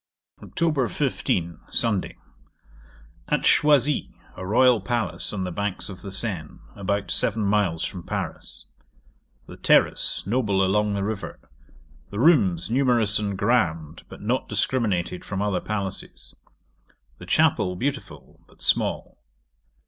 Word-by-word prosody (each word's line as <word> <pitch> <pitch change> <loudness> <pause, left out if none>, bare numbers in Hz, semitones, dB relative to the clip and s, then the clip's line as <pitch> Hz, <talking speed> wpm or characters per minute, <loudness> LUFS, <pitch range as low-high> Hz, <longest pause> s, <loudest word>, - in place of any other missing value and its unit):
'Oct. 150 -8 0
15. 85 -2 -1
Sunday. 110 -5 0 1.1
At - - +2
Choisi, 150 -1 +3 0.2
a - - -7
royal 120 +3 +4
palace 100 -6 -2
on 95 -3 -3
the 90 - -3
banks 100 +2 -3
of 95 -1 -9
the 100 - -7
Seine, 95 -6 -3 0.2
about 100 -1 -2
7m. 105 -6 +1
from 90 - -7
Paris. - - -5 0.8
The - - -11
terrace - - +2
noble 100 -3 +1
along 105 +2 +1
the 100 - -1
river. 105 0 -4 0.7
The 100 - -7
rooms 105 - +4
numerous 120 -4 +3
and 100 -2 -2
grand, 85 -8 0
but - - -11
not 120 +5 -1
discriminated 95 -8 -1
from 95 - -4
other 100 -3 0
palaces. 100 -3 -5 0.9
The - - -11
chapel 90 - +2
beautiful, 140 +7 -5
but - - -17
small. - - 0
100 Hz, 120 wpm, -24 LUFS, 95-120 Hz, 1.1 s, royal